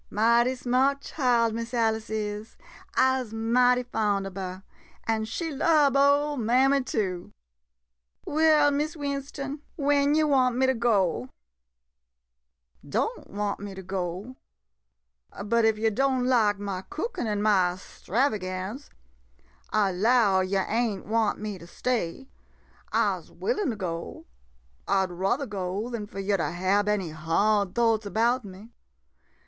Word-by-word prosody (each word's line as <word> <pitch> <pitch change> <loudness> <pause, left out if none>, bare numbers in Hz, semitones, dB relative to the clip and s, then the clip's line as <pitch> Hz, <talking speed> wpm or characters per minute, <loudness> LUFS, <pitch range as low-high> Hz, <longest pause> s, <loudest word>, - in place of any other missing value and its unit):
~\ - - -38
Mighty 235 +4 +3
smart 260 +3 +1
child, 240 -7 +1
Miss 230 +2 -4
Alice 225 -1 0
is 210 0 -4 0.2
— - - -22
I 260 0 +3
'se 225 -3 -9
mighty 245 +2 +3
fond 210 -5 -1
ob 195 -1 -7
her 185 -1 -6 0.2
— - - -29
an' 220 -1 0
she 325 +9 -4
lub 295 -1 +3
ole 285 +1 +3
mammy 260 +4 +3
too. 195 -8 -3 0.9
Well, 305 -1 +4
Miss 300 +3 -1
Winston, 280 0 -4
when 285 0 +2
yo' 310 0 +3
want 260 -4 +3
me 260 +1 +2
to 260 - +3
go? 200 - +1 1.5
Don' - - -2
want 205 0 -3
me 200 -1 -7
to 190 - -8
go? 185 +6 -4 1.1
But 230 +1 +2
if 220 -1 +3
yo* 220 +1 +1
don' 260 +2 +1
lak 225 -5 +3
ma 200 -2 -4
cookin' 345 - -4
an' 210 -1 -1
ma 185 -4 +3
'stravagance 200 +2 -3 0.4
— - - -34 0.2
I 195 - 0
'low 205 0 +3
yo' 190 +1 +1
ain't 225 -3 -1
want 220 +1 +1
me 210 -2 -5
to 170 - -12
stay. 245 +3 -2 0.6
I - - +1
'se - - -21
willin' 420 - -2
to 230 - -2
go 170 -4 -5 0.3
— - - -37
I 190 - +2
'd 185 - -9
ruther 195 +10 -1
go 200 +1 -4
dan 220 -3 -4
fo' 200 - -12
yo' 195 +1 0
to 165 - -1
hab 190 +4 +1
any 195 -6 -1
hard 185 +6 +1
thoughts 225 -3 +2
about 235 +5 +1
me. 200 +3 -12
225 Hz, 150 wpm, -26 LUFS, 195-260 Hz, 1.5 s, Well